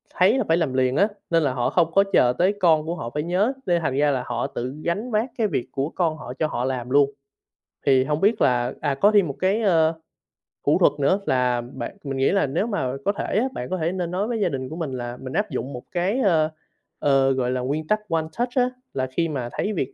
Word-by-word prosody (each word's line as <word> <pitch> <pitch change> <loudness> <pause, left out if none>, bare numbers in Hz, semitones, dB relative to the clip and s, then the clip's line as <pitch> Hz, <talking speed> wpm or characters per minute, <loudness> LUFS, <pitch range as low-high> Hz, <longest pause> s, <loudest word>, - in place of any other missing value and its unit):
thấy 195 +8 +4
là 260 - +1
phải 165 - +3
làm 155 -7 0
liền 130 0 +1
á, 200 +7 +4 0.2
nên 165 -2 +3
là 135 - +1
họ 125 -2 0
hông 170 -2 +3
có 195 - +6
chờ 125 -1 +5
tới 185 +3 +3
con 160 -4 +4
của 170 - -3
họ 115 -9 -5
phải 150 0 -1
nhớ, 190 +9 +1
nên 175 -2 +2
thành 135 -4 -1
ra 145 0 +3
là 130 -2 -1
họ 120 -1 -2
tự 125 +2 -5
gánh 210 +8 -2
vác 220 +4 +1
cái 220 - +2
việc 125 - -2
của 140 +2 -2
con 165 -3 -1
họ 125 -5 -7
cho 155 - +2
họ 125 -4 -2
làm 125 -2 -3
luôn. 140 +1 +4 0.7
Thì 130 -2 +5
hông 150 +2 -2
biết 210 +2 +2
là 125 0 +2
à, 145 -2 0
có 205 +9 +4
thêm 205 -4 +4
một 140 - -5
cái, 195 +4 +1
ơ, 165 -5 +3 0.7
thủ - - +4
thuật - - +5
nữa 185 +8 +3
là 125 -2 +1
bạn 125 +10 -7
mình 135 -2 -4
nghĩ 135 - +3
là 195 -7 +2
nếu 165 - -1
mà 135 - -1
có 200 - +3
thể 200 - -2
á, 240 - +1
bạn 125 - -5
có 185 - -1
thể 165 0 -1
nên 180 -2 -3
nói 195 +4 -1
với 235 -1 -2
gia 205 - +2
đình 130 -2 -4
của 160 - -6
mình 165 -5 -4
là 120 -1 -5
mình 130 0 -7
áp 210 -1 0
dụng 130 0 -4
một 125 - -7
cái, 190 +7 0
ơ, 165 -9 +3 0.5
ờ, 135 -1 +3
gọi 125 -2 0
là, 125 -1 -1
nguyên 150 +4 -2
tắc 215 0 +2
One 165 -1 +1 0.2
Touch 245 +1 +1
á, 250 -1 +3 0.2
là 130 -1 -1
khi 165 +4 0
mà 130 -6 -3
thấy 210 - -2
việc, 135 -7 -3
155 Hz, 265 wpm, -23 LUFS, 130-190 Hz, 0.7 s, có